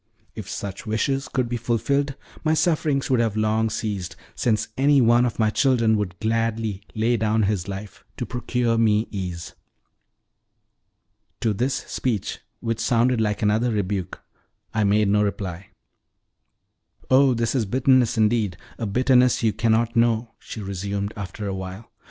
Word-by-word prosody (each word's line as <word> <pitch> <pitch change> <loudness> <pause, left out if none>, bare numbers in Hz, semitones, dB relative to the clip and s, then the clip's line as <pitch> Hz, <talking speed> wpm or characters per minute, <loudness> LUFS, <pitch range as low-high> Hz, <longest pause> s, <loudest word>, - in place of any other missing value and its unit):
"If - - -8
such 100 +1 -6
wishes 135 +5 0
could 130 -3 0
be 120 +1 -2
fulfilled 135 +4 0 0.3
my 155 0 +2
sufferings 155 -5 +1
would 125 - +3
have 110 -2 0
long 110 +1 +1
ceased, 100 -5 -4 0.2
since 110 -2 0
any 140 +1 +4
one 120 0 +4
of 115 - -5
my 110 -1 +2
children 115 -3 +3
would 90 -5 -3
gladly 115 -2 -1
lay 115 +2 +2
down 110 0 +1
his 100 -3 -1
life 100 -1 -7
to - - -3
procure 120 -1 -1
me 110 0 +3
ease." 90 -4 -5 1.9
To 110 - +1
this 125 +7 0
speech, 115 -7 -2 0.2
which 115 -1 -2
sounded 120 0 +2
like 105 0 -1
another 110 +4 +2
rebuke, 100 -4 -2 0.5
I 110 - +1
made 105 +1 +3
no 105 +1 +3
reply. 95 -3 -3 1.4
"Oh, 130 -1 +5
this 115 -1 0
is 125 -5 +1
bitterness 130 +1 +3
indeed 110 -4 +2 0.2
a 115 - -2
bitterness 125 +3 +3
you 110 -2 +2
cannot 115 0 +1
know," 115 0 +2
she 110 - -8
resumed 100 +1 -3
after 105 +1 -6
a 100 - -2
while. 95 +3 -7
110 Hz, 150 wpm, -23 LUFS, 105-120 Hz, 1.9 s, Oh